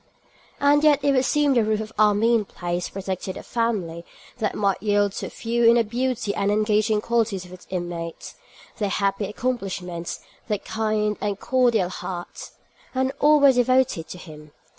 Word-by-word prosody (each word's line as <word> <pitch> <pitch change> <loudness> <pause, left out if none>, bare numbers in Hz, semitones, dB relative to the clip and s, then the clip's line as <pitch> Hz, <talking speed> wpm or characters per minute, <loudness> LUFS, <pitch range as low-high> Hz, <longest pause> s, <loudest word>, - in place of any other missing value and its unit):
And 290 +1 +4
yet 290 -2 +4
it 285 - +3
would 260 -1 +2
seem 295 0 +2
the 235 -3 +3
roof 215 0 0
of 220 0 -6
Armine 215 +2 +3
Place 175 -2 -4
protected 190 -1 -5
a - - -8
family 200 -9 -2 0.4
that 215 -2 -1
might 200 -2 0
yield 205 -1 +2
to - - -5
few 235 +1 -2
in 230 +1 +7
the 235 - +4
beauty 240 -1 -2
and 200 0 0
engaging 215 0 +2
qualities 220 -6 0
of 180 - -13
its 185 - -13
inmates, 175 -2 -5 0.5
their 205 -2 0
happy 195 +1 0
accomplishments, 190 -7 -4 0.3
their 210 -3 0
kind 215 0 -1
and 205 -1 -2
cordial 240 -8 +2
hearts. 175 -1 -7 0.4
And 260 0 +1
all 300 +1 +5
were 280 -1 +7
devoted 250 -8 +2
to - - -8
him. 150 -3 -12
210 Hz, 165 wpm, -24 LUFS, 190-240 Hz, 0.5 s, in